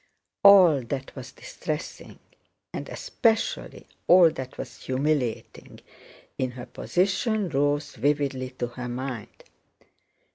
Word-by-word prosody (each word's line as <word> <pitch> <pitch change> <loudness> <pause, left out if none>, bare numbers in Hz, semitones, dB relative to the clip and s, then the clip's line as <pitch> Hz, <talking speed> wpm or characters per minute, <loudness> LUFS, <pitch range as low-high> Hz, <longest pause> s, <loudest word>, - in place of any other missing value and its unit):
All 185 -8 +8
that 130 +2 -6
was 130 -2 -8
distressing, 150 +3 -7 0.6
and - - -6
especially 230 - -1 0.2
all 175 -2 +7
that 130 -3 -8
was - - -8
humiliating, 130 -3 -2 0.6
in 130 - 0
her 120 -1 -8
position 200 +2 0
rose 145 +1 0
vividly 135 0 -1
to 130 -1 -4
her 125 +1 -7
mind. 125 -2 -6
140 Hz, 105 wpm, -26 LUFS, 130-170 Hz, 0.6 s, All